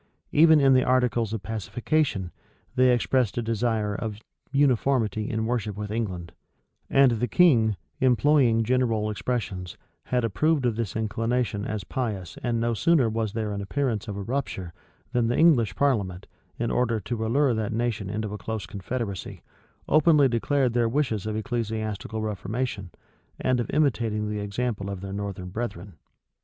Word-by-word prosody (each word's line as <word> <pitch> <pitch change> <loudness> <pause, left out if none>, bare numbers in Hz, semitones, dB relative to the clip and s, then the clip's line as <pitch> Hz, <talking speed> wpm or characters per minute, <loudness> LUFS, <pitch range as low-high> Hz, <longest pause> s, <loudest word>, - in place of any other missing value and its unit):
Even 160 0 +6
in 135 -1 +5
the 130 -1 +4
articles 125 -3 +1
of 110 -3 -4
pacification, 110 - -1 0.4
they 130 -1 +5
expressed 125 -2 +1
a - - +1
desire 110 -2 0
of 105 0 -4 0.3
uniformity 125 -6 +2
in 110 0 -1
worship 110 -4 -2
with 105 0 -5
England; 95 -7 -3 0.6
and 135 -2 +5
the 120 +1 0
king, 115 - +4 0.2
employing 130 -2 +4
general 115 -3 +1
expressions, 100 -5 -3 0.3
had 125 -1 0
approved 140 - +1
of 120 -3 +1
this 115 -3 -3
inclination 110 0 -1
as 110 -2 -3
pious 100 -8 -4
and 120 -2 0
no 115 +1 +1
sooner 130 +2 +3
was 110 -2 -2
there 110 -2 -2
an 100 0 -3
appearance 115 0 -2
of 100 -2 -5
a 100 - -4
rupture, 95 -8 -3 0.4
than 120 -2 +1
the 120 - 0
English 125 - +4
parliament, 100 -10 0 0.3
in 120 0 -1
order 120 -3 +1
to 110 +1 -4
allure 130 +4 +2
that 110 0 -2
nation 115 -3 -2
into 105 0 -3
a 105 - -6
close 105 +1 -4
confederacy, 100 +1 -5 0.4
openly 155 -2 +5
declared 125 +1 +1
their 120 -1 +2
wishes 115 -6 -1
of 110 - -2
ecclesiastical 110 -1 -3
reformation, 105 0 -3 0.5
and 130 -1 +1
of 120 - -2
imitating 115 -8 0
the 105 - -3
example 100 0 -3
of 100 -2 -5
their 95 0 -6
northern 100 -2 -5
brethren. 100 -3 -5
115 Hz, 155 wpm, -26 LUFS, 105-125 Hz, 0.6 s, Even